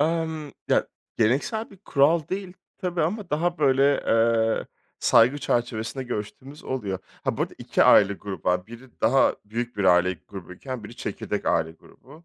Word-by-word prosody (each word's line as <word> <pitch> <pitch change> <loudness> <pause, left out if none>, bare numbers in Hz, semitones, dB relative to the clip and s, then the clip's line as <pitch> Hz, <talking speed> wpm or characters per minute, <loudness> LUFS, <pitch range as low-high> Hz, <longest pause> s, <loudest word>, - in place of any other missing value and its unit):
Emm. 160 -1 -1 0.2
Ya, - - +3 0.3
geleneksel 140 - 0
bir 200 - -14
kural 155 -3 +2
değil 190 -1 -4 0.3
tabii 180 -2 -1
ama 190 +4 -2
daha 170 +3 0
böyle, 140 0 +3
eee, 115 0 +2 0.3
saygı 125 +6 +4
çerçevesinde 120 0 -2
görüştüğümüz 130 +6 -7
oluyor. 105 -8 -3 0.3
Ha, - - 0
bu - - 0
arada - - -4
2 - - +1
aile 100 -1 +6
grubu 100 -1 -5
var. 90 +1 +1
Biri 120 +2 -14
daha 130 +5 +4
büyük 115 +2 -4
bir 100 - -1
aile 90 0 +5 0.2
grubuyken 100 +6 -8
biri 115 - -10
çekirdek - - -4
aile 80 0 +1
grubu. 145 - -18
130 Hz, 155 wpm, -25 LUFS, 105-155 Hz, 0.3 s, aile